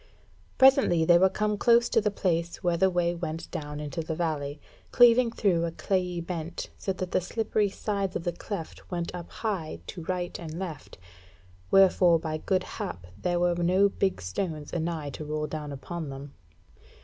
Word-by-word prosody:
Presently 260 -11 +5
they 175 +1 +6
were 190 +1 +5
come 210 +1 -1
close 235 0 +5
to 225 - +3
the 210 - +1
place 170 -4 -1
where 175 -1 +2
the 190 +3 +3
way 175 -1 +1
went 165 -2 -5
down 150 -1 -5
into 150 +2 -4
the 160 0 -4
valley, 150 -3 -2 0.3
cleaving 245 0 +6
through 185 -7 +1
a 170 - -1
clayey 180 0 -1
bent, 170 -1 -5
so 195 - -3
that 185 -1 -4
the - - +2
slippery 215 +1 0
sides 200 -1 -2
of - - -2
the 175 - 0
cleft 175 0 -7
went 175 -1 -3
up 175 -1 -7
high 185 - -3
to 170 - -7
right 180 -1 -3
and 165 -2 -7
left; 175 -6 -7 0.7
wherefore 185 -3 +6
by 155 -1 -4
goodhap 185 - -3 0.2
there 175 -1 +1
were 175 0 +3
no 180 +3 +3
big 190 - -1
stones 150 - -4
anigh 160 -3 -2
to 155 - -7
roll 150 0 -2
down 150 -1 -5
upon 155 +3 -6
them. 135 +1 -8
175 Hz, 175 wpm, -28 LUFS, 160-190 Hz, 0.7 s, they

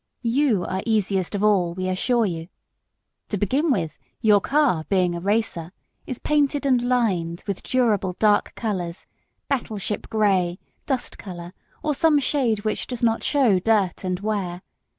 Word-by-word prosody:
You 235 -5 +2
are 190 0 -2
easiest 200 -4 0
of 200 - -1
all, 185 -5 +3
we 185 0 -2
assure 230 +6 +1
you; 165 -4 -4 0.8
to 205 - -1
begin 265 - +1
with, 170 - -1 0.2
your 210 -3 +4
car 275 - +2
being 185 -3 +2
a 170 - -3
racer, 195 -3 -1 0.3
is 255 - -4
painted 290 -1 +1
and 255 -3 +3
lined 195 -9 0
with 200 -3 -3
durable 215 -8 +1
dark 210 -1 +2
colours 185 -6 -3 0.4
battleship 215 -6 -3
grey, 195 -5 +2 0.3
dust 265 -3 -2
colour, 175 -2 -8 0.3
or 300 - +1
some 310 +1 +3
shade 255 -6 +1
which 215 - -2
does 245 -2 -5
not 225 -1 +2
show 250 -10 +3
dirt 200 -2 +1
and 180 0 -2
wear. 195 -4 -2
210 Hz, 150 wpm, -23 LUFS, 185-245 Hz, 0.8 s, your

